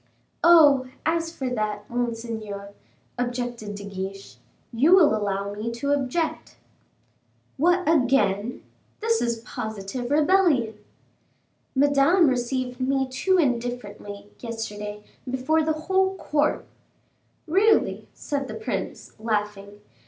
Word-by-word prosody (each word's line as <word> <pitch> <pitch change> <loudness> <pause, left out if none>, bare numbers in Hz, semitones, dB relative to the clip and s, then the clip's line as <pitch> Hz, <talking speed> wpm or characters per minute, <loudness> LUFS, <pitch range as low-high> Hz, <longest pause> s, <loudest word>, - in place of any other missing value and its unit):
"Oh! 295 -6 +7 0.2
as 330 +1 0
for 265 -5 -4
that, 210 -3 -2
monseigneur," 225 -4 -4 0.5
objected 245 -4 -3
De 200 - -8
Guiche, 195 0 -7 0.4
"you 290 +11 +5
will 320 -12 +5
allow 200 -1 -2
me 215 +3 -4
to 280 +5 -2
object." 285 +4 -1 1.0
"What, 355 +5 +2
again! 245 -7 +2 0.4
this 455 +1 +1
is 235 -1 -1
positive 220 +3 -5
rebellion." 300 - +3 1.0
"Madame 285 +5 +4
received 250 0 -2
me 265 +1 +1
too 370 +9 +1
indifferently, 235 - -2
yesterday, 210 -3 -6 0.3
before 260 +5 +1
the 315 0 +1
whole 380 0 +2
court." 300 -4 0 0.8
"Really!" 395 +7 +2
said 280 -2 -3
the - - -6
prince, 445 - -5
laughing. 210 -2 -3
245 Hz, 105 wpm, -25 LUFS, 210-305 Hz, 1.0 s, Oh